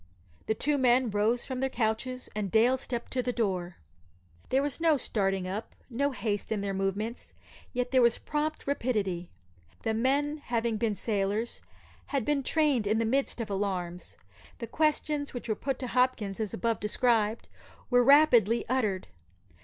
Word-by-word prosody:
The 220 - +1
two 290 +5 0
men 250 -2 +3
rose 215 +4 +1
from 260 -1 -4
their 265 +1 0
couches, 250 +2 -2
and 210 -2 -2
Dale 230 +6 +4
stepped 245 -2 -5
to 255 - +1
the 250 0 -1
door. 185 -7 -2 0.7
There 270 +2 +2
was 290 +2 -2
no 325 -3 +4
starting 195 -6 -1
up, 200 +4 -5 0.2
no 280 +4 +1
haste 220 -7 -3
in 215 -2 0
their 200 -1 -2
movements, 195 +4 -3 0.4
yet 250 0 -2
there 260 -1 +5
was 235 -1 +4
prompt 305 +1 -3
rapidity. 210 -10 -1 0.5
The 225 - 0
men, 280 +6 +1
having 235 -4 -1
been 215 -1 0
sailors, 210 +2 -1 0.5
had 275 -6 -1
been 295 -2 +1
trained 280 -6 +2
in 215 +2 +2
the 230 - +1
midst 265 +3 0
of 220 -2 -5
alarms. 185 -3 -3 0.4
The 235 - -5
questions 300 +2 0
which 245 - -5
were 220 - +1
put 265 +5 -3
to 255 - -5
Hopkins, 240 -6 +1
as 215 -3 -2
above 230 +3 -1
described, 220 0 +1 0.4
were 245 0 +5
rapidly 240 -5 +5
uttered. 215 -7 0
235 Hz, 165 wpm, -29 LUFS, 210-260 Hz, 0.7 s, there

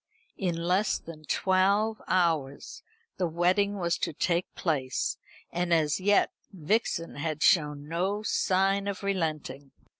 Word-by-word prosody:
In 180 -4 0
less 180 +5 +1
than 155 -2 -11
twelve 200 +6 +2
hours 160 -7 0 0.4
the 180 - 0
wedding 185 +5 +1
was 170 -2 -1
to - - -2
take 170 +3 0
place; 135 -6 -1 0.3
and 175 0 -2
as 155 -2 +2
yet 205 +2 +3 0.2
Vixen 170 -2 -1
had 155 0 -2
shown 150 -4 +3
no 190 +6 -1
sign 195 0 +1
of 200 -1 -4
relenting. 155 -7 -2
175 Hz, 125 wpm, -28 LUFS, 155-195 Hz, 0.4 s, yet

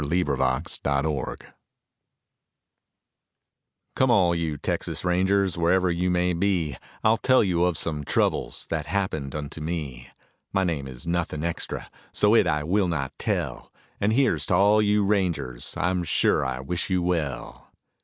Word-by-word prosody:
TEXAS 70 -3 0
RANGERS 70 0 -1 2.6
Come, 130 - +3
all 95 -7 +4
you 80 -3 -2
Texas - - -3
rangers, 95 +1 +2
wherever 90 +2 +3
you 90 +2 0
may 90 0 +1
be, 85 -5 0 0.3
I'll 110 +1 +4
tell 130 +1 +4
you 90 -3 +2
of 90 -3 0
some 75 -3 -2
troubles - - 0
that - - -2
happened 80 -7 -2
unto 75 +1 -5
me. 75 -7 -5 0.4
My 95 - +1
name 80 -7 -2
is 65 +5 -9
nothing 85 -3 -2
extra, 85 0 -3 0.2
so - - +3
it - - +5
I 75 0 0
will 95 +4 +1
not 70 -6 -2
tell, - - -3 0.3
And 105 +2 +2
here's 110 - +2
to 90 - +2
all 105 +3 +5
you 105 -1 +2
rangers, 85 -12 -1
I 90 - +1
am 90 -1 -1
sure 85 - +2
I 65 -1 -3
wish 85 +8 -3
you 90 -2 +1
well. 80 -7 -3
85 Hz, 150 wpm, -25 LUFS, 75-95 Hz, 2.6 s, it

